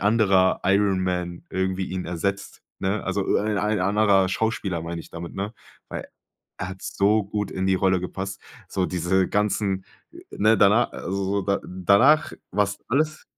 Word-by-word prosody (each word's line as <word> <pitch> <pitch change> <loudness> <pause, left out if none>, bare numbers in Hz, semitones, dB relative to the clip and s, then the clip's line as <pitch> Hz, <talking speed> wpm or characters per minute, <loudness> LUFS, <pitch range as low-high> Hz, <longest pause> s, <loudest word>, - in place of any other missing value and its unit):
anderer 100 -3 +3
Iron 100 0 +3
Man 90 -1 -3
irgendwie 95 0 -1
ihn 90 -1 -4
ersetzt, 100 +3 -3 0.2
ne? 95 +2 -1
Also - - -1
öh - - +2
ein 105 0 -1
ein 105 +2 0
anderer 100 -1 +3
Schauspieler, 95 -4 -1
meine 85 0 -5
ich - - -14
damit, 85 0 -7
ne? 100 +2 -3 0.4
Weil - - -6 0.5
er 95 - -3
hat 95 0 -10
so 105 +1 +2
gut 105 0 -3
in 95 0 -2
die 95 - +3
Rolle 95 -1 +2
gepasst, 95 +2 -5 0.3
so 95 -1 0
diese 90 +1 +1
ganzen 100 -2 0 0.5
ne, 110 +2 +3
dana 105 +5 +5
also 95 +1 -3
so 100 +1 0
da 100 0 +1
danach 100 - +4 0.2
war 105 +3 +3
es 100 +1 -5
alles 155 +4 0
95 Hz, 170 wpm, -24 LUFS, 95-105 Hz, 0.5 s, dana